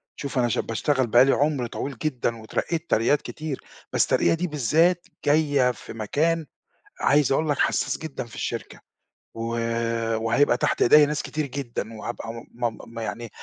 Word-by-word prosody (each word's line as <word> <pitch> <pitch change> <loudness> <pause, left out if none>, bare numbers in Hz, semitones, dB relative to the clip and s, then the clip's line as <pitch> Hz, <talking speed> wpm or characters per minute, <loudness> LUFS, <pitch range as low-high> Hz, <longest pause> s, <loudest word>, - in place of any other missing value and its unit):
شوف 140 -2 -5
أنا 120 - +2
ش - - 0
باشتغل 130 +3 0
بقى 120 +3 +6
لي 135 - +4
عُمر 145 -4 +1
طويل 135 +2 -5
جدًا 125 -4 -1
واترقيت 165 +9 -3
ترقيات 130 +6 +3
كتير، 155 -3 -5 0.3
بس - - +4
الترقية - - +3
دي 175 +2 -1
بالذات 165 +5 +2 0.2
جاية 145 -4 +3
في 110 - -10
مكان 155 +10 0 0.6
عايز 145 -1 +4
أقول 155 +3 +1
لك 145 - +1
حسّاس - - +1
جدًا 160 -6 -6
في 115 - -13
الشركة، - - -4 0.6
و 115 - -5 0.8
وهيبقى 115 +3 +2
تحت - - 0
إيديّا 150 +4 +7
ناس 150 0 -2
كتير 155 -1 -3
جدًا 125 -5 -5
وهابقى 115 +1 -6
م 115 0 -8 0.4
مم 115 0 -8
يعني 115 +1 -5
135 Hz, 165 wpm, -25 LUFS, 115-150 Hz, 0.8 s, إيديّا